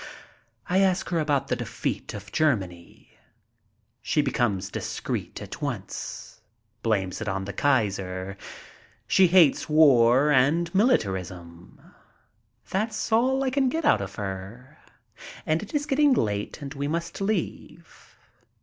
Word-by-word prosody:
I 185 Hz, +2 st, +2 dB
ask 190 Hz, -2 st, +1 dB
her 170 Hz, -, 0 dB
about 145 Hz, -3 st, 0 dB
the -, -, +1 dB
defeat -, -, -4 dB
of 105 Hz, 0 st, -9 dB
Germany. 95 Hz, -, -2 dB, 0.9 s
She -, -, +1 dB
becomes 100 Hz, -5 st, -1 dB
dis -, -, -5 dB
creet -, -, -4 dB
at -, -, -9 dB
once. 115 Hz, 0 st, -6 dB, 0.4 s
Blames 100 Hz, -3 st, -1 dB
it 115 Hz, -, -4 dB
on 95 Hz, 0 st, -3 dB
the 100 Hz, -, -6 dB
Kaiser. 95 Hz, -7 st, 0 dB, 0.7 s
She 190 Hz, -, +5 dB
hates 170 Hz, -5 st, +4 dB
war 140 Hz, -2 st, +5 dB
and 150 Hz, +6 st, +2 dB
militarism. 95 Hz, -, -1 dB, 0.9 s
That's 215 Hz, +3 st, -2 dB
all 260 Hz, +4 st, +3 dB
I 260 Hz, -, 0 dB
can 265 Hz, -1 st, +2 dB
get 320 Hz, +3 st, -2 dB
out 105 Hz, -, +4 dB
of 100 Hz, 0 st, -6 dB
her, 105 Hz, +9 st, -7 dB, 0.7 s
and 155 Hz, +1 st, +1 dB
it 210 Hz, -, -9 dB
is 290 Hz, 0 st, 0 dB
getting 295 Hz, -1 st, +3 dB
late 105 Hz, -, -2 dB
and 140 Hz, +1 st, -6 dB
we 140 Hz, 0 st, -3 dB
must 170 Hz, +4 st, -4 dB
leave. 210 Hz, +2 st, -5 dB
140 Hz, 130 wpm, -25 LUFS, -, 0.9 s, She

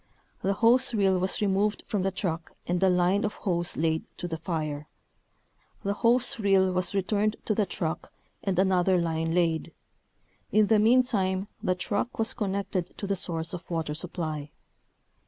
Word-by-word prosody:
The 195 Hz, -, +1 dB
hose 240 Hz, +4 st, +4 dB
reel 195 Hz, -3 st, +3 dB
was 185 Hz, +3 st, -1 dB
removed 205 Hz, +1 st, +1 dB
from 205 Hz, -, -1 dB
the 190 Hz, -, +1 dB
truck 170 Hz, -4 st, -3 dB
and 175 Hz, +1 st, -1 dB
a 190 Hz, -, +5 dB
line 180 Hz, +3 st, +2 dB
of 210 Hz, -, -1 dB
hose 175 Hz, -3 st, -2 dB
laid 160 Hz, 0 st, +1 dB
to 175 Hz, -, -4 dB
the 165 Hz, -2 st, -4 dB
fire. 155 Hz, -3 st, -3 dB, 1.0 s
The 200 Hz, -, 0 dB
hose 235 Hz, +3 st, +2 dB
reel 195 Hz, -2 st, +3 dB
was 185 Hz, +2 st, -1 dB
re 195 Hz, -, +2 dB
turned 210 Hz, +2 st, +1 dB
to 215 Hz, -, +1 dB
the 210 Hz, -1 st, +1 dB
truck 160 Hz, -2 st, -4 dB, 0.3 s
and 190 Hz, -3 st, -1 dB
another 185 Hz, -1 st, +3 dB
line 165 Hz, -1 st, -1 dB
laid. 165 Hz, -2 st, +1 dB, 0.8 s
In 215 Hz, 0 st, +5 dB
the 215 Hz, +1 st, +4 dB
meantime 210 Hz, -5 st, +2 dB
the 185 Hz, -, +1 dB
truck 205 Hz, +5 st, -2 dB
was 225 Hz, 0 st, +1 dB
connected 195 Hz, -4 st, -3 dB
to -, -, -4 dB
the 200 Hz, 0 st, 0 dB
source 165 Hz, -2 st, -2 dB
of 180 Hz, 0 st, -7 dB
water 165 Hz, -3 st, -2 dB
supply. 155 Hz, -3 st, -4 dB
190 Hz, 170 wpm, -27 LUFS, 170-205 Hz, 1.0 s, a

